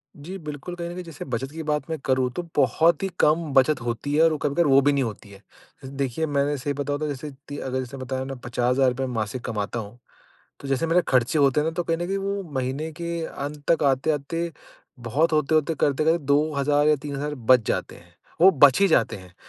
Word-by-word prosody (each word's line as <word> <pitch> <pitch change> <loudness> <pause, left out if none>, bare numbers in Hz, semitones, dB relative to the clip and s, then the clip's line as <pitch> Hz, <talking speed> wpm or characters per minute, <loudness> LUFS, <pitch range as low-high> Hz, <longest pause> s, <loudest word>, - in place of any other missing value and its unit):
जी। 175 +7 -8
बिल्कुल, 150 +2 -7
कहीं 170 -1 -5
न 175 - -6
कहीं 180 - -6
जैसे 165 -4 -9
बचत 135 +1 -4
की 160 +1 -6
बात 150 -2 -1
मैं 160 - -2
करूँ 130 -1 +2
तो - - -1
बहुत 155 +6 +3
ही 195 - 0
कम 160 +2 +3
बचत 135 +3 +4
होती 120 +4 -3
है 160 - +5
और 160 -2 +3
कभी-कभार 150 +4 +1
वो 135 0 +6
भी 145 - +3
नहीं 140 - +1
होती 110 -2 -6
है। 100 -1 -14 0.6
देखिए 140 +3 -1
मैंने 145 -1 0
सही 140 +2 -2
बताऊँ 145 +1 -3
तो 155 - -2
जैसे 145 +1 -5 0.2
ती 145 - -6
अगर 130 -1 -3
जैसे 130 +1 -6
बताया 130 0 -4
ना 135 0 -5
₹50,000 125 +2 +1
मासिक 110 +2 -3
कमाता 110 0 -3
हूँ, 110 +3 -9 0.6
तो 140 - -7
जैसे 135 +4 0
मेरे 170 +2 +3
खर्चे 130 +3 +2
होते 140 0 +4
हैं 150 - -1
ना - - +1
तो 175 - -1
कहीं 165 0 0
न 175 +1 -3
कहीं 195 - -1
वो 200 0 -2
महीने 135 +4 -2
के 170 -1 -3
अंत 145 +1 -6
तक 165 - +3
आते-आते 150 +5 0 0.5
बहुत 140 +8 +1
होते-होते 155 +1 +2
करते-करते 155 +4 +2
2,000 145 0 +2
या 155 - +4
3,000 145 0 -4
बच 125 -1 +4
जाते - - -2
हैं, 85 0 -20 0.3
वो 185 +3 +9
बच 140 -3 +5
ही 200 - +5
जाते 115 - +2
हैं। 90 -2 -14
145 Hz, 220 wpm, -24 LUFS, 130-160 Hz, 0.6 s, वो